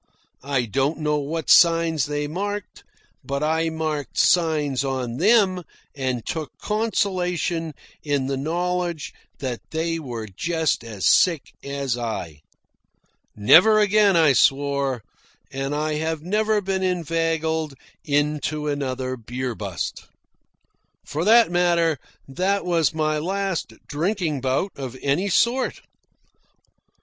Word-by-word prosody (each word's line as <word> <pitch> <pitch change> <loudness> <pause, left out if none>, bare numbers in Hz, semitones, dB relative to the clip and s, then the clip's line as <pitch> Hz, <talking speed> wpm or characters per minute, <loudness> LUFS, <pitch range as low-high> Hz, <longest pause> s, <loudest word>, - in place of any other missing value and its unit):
I 135 -2 -1
don't 135 +7 0
know 150 -1 0
what 155 +2 -2
signs 165 -4 +5
they 145 0 -2
marked, 205 +6 -5 0.4
but 140 +1 -3
I 160 +1 +1
marked 155 -2 -4
signs 150 -6 +2
on 130 -3 -3
them 190 - +3 0.3
and 130 -4 -2
took 160 -5 -5
consolation 180 -7 -1 0.3
in 145 -3 -1
the 135 +1 -1
knowledge 175 +3 -2 0.2
that 125 -4 -4
they 165 +1 -2
were 120 -7 -6
just 160 - -1
as 105 -6 -2
sick 170 -6 +3
as 140 -3 -2
I. 90 -10 -4 1.0
Never 180 - +6
again, 205 -1 +4
I 155 -4 +5
swore. 140 -3 +1 0.5
And 135 +2 -3
I 155 +1 -1
have 160 -1 -2
never 210 +3 +1
been 190 -1 -2
inveigled 165 -3 -1 0.3
into 150 +1 -1
another 130 -3 -2
beer 125 +1 -4
bust. 100 -8 -5 1.0
For 155 +3 -3
that 230 -2 +6
matter, 170 -3 +2 0.3
that 185 +8 -1
was 165 -6 +2
my 155 -1 0
last 190 - -2
drinking 160 -2 -1
bout 135 +9 0
of 130 -2 -6
any 145 +9 +1
sort. 235 +8 +1
155 Hz, 120 wpm, -23 LUFS, 135-175 Hz, 1.0 s, Never